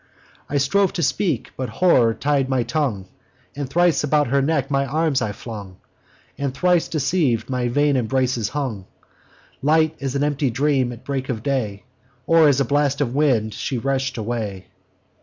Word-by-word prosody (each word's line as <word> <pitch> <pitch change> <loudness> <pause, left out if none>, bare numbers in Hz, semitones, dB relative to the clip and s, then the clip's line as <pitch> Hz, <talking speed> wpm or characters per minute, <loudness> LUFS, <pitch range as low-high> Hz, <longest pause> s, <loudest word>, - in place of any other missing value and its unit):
I 145 - 0
strove 185 +8 +2
to 170 - -2
speak: 160 - 0
but 130 -2 -4
horror 120 -5 +3
tied 140 -2 0
my 130 -2 +1
tongue; 120 -6 -2 0.5
And 140 -2 -4
thrice 175 +2 +2
about 150 -2 +2
her 140 +2 +2
neck 140 -1 0
my 135 0 +2
arms 155 0 +1
I 105 - -1
flung, 100 -4 -9 0.6
And, 140 -2 -2
thrice 180 0 +2
deceiv'd, 140 -6 0
on 125 -1 0
vain 145 +3 +2
embraces 125 -2 0
hung. 120 -10 -4 0.7
Light 155 +2 +3
as 135 -1 -3
an 140 - +1
empty 145 -2 0
dream 130 0 +1
at 120 0 -10
break 135 -2 -3
of 115 -4 -3
day, 115 -8 -2 0.4
Or 165 0 +5
as 140 -2 +3
a 140 - +2
blast 140 +1 +1
of 130 -4 -1
wind, 125 -7 +1
she 130 - -3
rush'd 135 +1 -1
away. 105 -4 -4
135 Hz, 170 wpm, -21 LUFS, 120-145 Hz, 0.7 s, Or